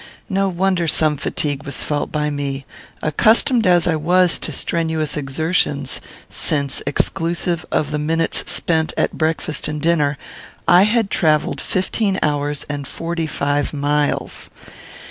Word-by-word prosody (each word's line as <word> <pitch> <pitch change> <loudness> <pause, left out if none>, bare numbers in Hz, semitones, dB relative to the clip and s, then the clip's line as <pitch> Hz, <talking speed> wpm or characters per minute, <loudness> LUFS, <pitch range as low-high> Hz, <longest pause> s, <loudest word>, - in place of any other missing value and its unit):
No 195 0 +1
wonder 185 -1 +1
some 155 0 +2
fatigue 145 0 -2
was 140 -3 -3
felt 145 -1 -2
by 150 -1 0
me, 140 -1 -3 0.4
accustomed 220 - +3
as 175 -2 +4
I 165 - +2
was 175 +3 +3
to - - -4
strenuous 160 -3 -1
exertions, 145 -1 -1 0.3
since, 140 -2 -2
exclusive 170 +4 0
of 150 -1 0
the 150 - -1
minutes 165 +2 0
spent 160 -2 +1
at - - +1
breakfast 155 -1 -1
and 150 0 -3
dinner, 150 -3 +2 0.5
I 175 +3 +7
had 225 -3 +1
travelled 155 -3 +1
fifteen 190 +1 0
hours 145 -1 -1
and 145 -2 -4
forty 165 +1 -3
five 145 0 -1
miles. 145 0 0
155 Hz, 135 wpm, -20 LUFS, 145-175 Hz, 0.5 s, I